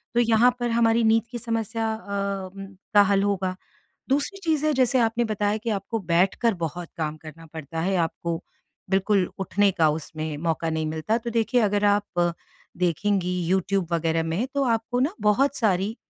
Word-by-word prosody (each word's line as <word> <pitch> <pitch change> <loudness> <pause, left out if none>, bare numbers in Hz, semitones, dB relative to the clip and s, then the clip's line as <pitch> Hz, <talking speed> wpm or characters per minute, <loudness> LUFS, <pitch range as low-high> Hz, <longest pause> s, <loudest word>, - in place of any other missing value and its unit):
तो - - +4
यहाँ 230 +1 +4
पर 240 - -1
हमारी 230 0 +3
नींद 225 0 +4
की 240 - -4
समस्या 225 -1 -2
अ, 200 -3 -4 0.4
का 205 - +8
हल 200 0 +2
होगा। 190 -2 -1 0.5
दूसरी 290 +8 0
चीज़ 310 -3 +1
है 305 - +3
जैसे 255 -1 +3
आपने 230 +1 +2
बताया 210 -1 0
कि 225 +2 -4
आपको 210 +3 -2
बैठकर 190 +6 +2
बहुत 170 0 -4
काम 155 -1 -2
करना 160 +1 -12
पड़ता 160 0 -6
है, 190 +3 0
आपको 165 0 -1 0.5
बिल्कुल 195 0 +2
उठने 200 +1 +2
का 165 -4 +3
उसमें 155 0 -4
मौका 165 0 -1
नहीं 160 0 -1
मिलता। 160 +8 -1
तो 235 0 -5
देखिए 235 +1 +1
अगर 205 0 +2
आप 200 -4 +1 0.5
देखेंगी 180 +1 0
यूट्यूब 190 -1 +1
वग़ैरह 165 0 +1
में 170 +10 -1
तो 280 - +2
आपको 235 0 0
ना 290 +8 +1
बहुत 265 +7 +3
सारी 205 -1 +1
200 Hz, 170 wpm, -25 LUFS, 170-230 Hz, 0.5 s, का